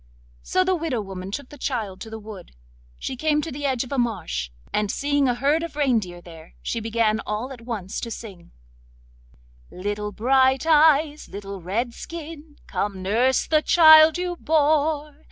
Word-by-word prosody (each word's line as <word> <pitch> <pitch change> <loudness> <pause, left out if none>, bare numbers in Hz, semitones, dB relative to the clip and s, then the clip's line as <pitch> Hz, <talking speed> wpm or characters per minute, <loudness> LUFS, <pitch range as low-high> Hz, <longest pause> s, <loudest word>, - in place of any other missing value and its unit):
So 370 - +1
the 375 0 +1
widow 325 -8 -2
woman 190 -2 -6
took 255 +6 -6
the 290 - -13
child 215 -9 -3
to 225 - -7
the 220 - -7
wood. 210 - -11 0.4
She 260 - -5
came 300 +3 +1
to 325 - -5
the 285 +1 -3
edge 260 -2 0
of 255 - -11
a 275 - 0
marsh, 180 - -2 0.2
and 210 -1 0
seeing 285 +1 +1
a 245 - +1
herd 285 +6 +1
of 330 -3 -6
reindeer 225 -12 0
there, 165 -2 -14
she 230 - -2
began 225 -1 +1
all 220 +5 -4
at 250 -3 -10
once 220 -6 -5
to 235 - -5
sing— 200 -6 -9 1.2
'Little 205 +2 -4
Bright 260 +5 +2
eyes, 305 -1 +4
little 200 -1 -7
Redskin, 290 - -5
Come 195 -2 -3
nurse 240 +7 +2
the 310 -1 +2
child 315 -1 +7
you 355 -1 -3
bore! 300 -1 +1
250 Hz, 170 wpm, -23 LUFS, 210-300 Hz, 1.2 s, child